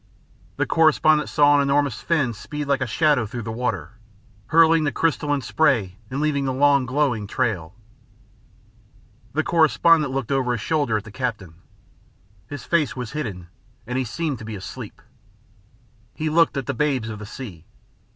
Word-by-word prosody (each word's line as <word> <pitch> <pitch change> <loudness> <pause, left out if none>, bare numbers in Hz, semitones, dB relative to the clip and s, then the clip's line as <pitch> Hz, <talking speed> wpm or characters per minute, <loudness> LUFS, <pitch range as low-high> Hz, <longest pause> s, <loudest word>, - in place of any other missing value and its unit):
The - - 0
correspondent 155 -1 +3
saw 145 0 +4
an 145 - +4
enormous 140 -3 +1
fin 140 -8 0
speed 150 +7 -6
like 140 -1 +1
a - - 0
shadow 145 -8 +2
through 120 +2 -6
the 110 - -5
water, 120 0 -4 0.5
hurling 165 0 +5
the 145 - 0
crystalline 145 -2 0
spray 115 -8 +1
and 135 - -3
leaving 145 -2 0
the 130 - 0
long 140 -1 +3
glowing 130 -6 0
trail. 100 -8 -2 1.6
The 155 +3 +1
correspondent 155 -1 +3
looked 135 -2 -3
over 130 -3 +1
his 120 - -3
shoulder 145 -8 0
at 105 - -5
the 110 - -12
captain. 110 -8 -4 0.9
His 145 +3 -7
face 155 -7 0
was 125 -3 -5
hidden, 105 - -5 0.4
and 125 - -5
he 130 - +1
seemed 145 +2 -3
to - - -9
be 110 -1 -6
asleep. 95 - -9 1.1
He 155 0 -2
looked 165 -2 +3
at 135 - -2
the - - -2
babes 130 -3 0
of 105 -1 -6
the 105 - -8
sea. 100 -9 -9
135 Hz, 165 wpm, -23 LUFS, 115-150 Hz, 1.6 s, hurling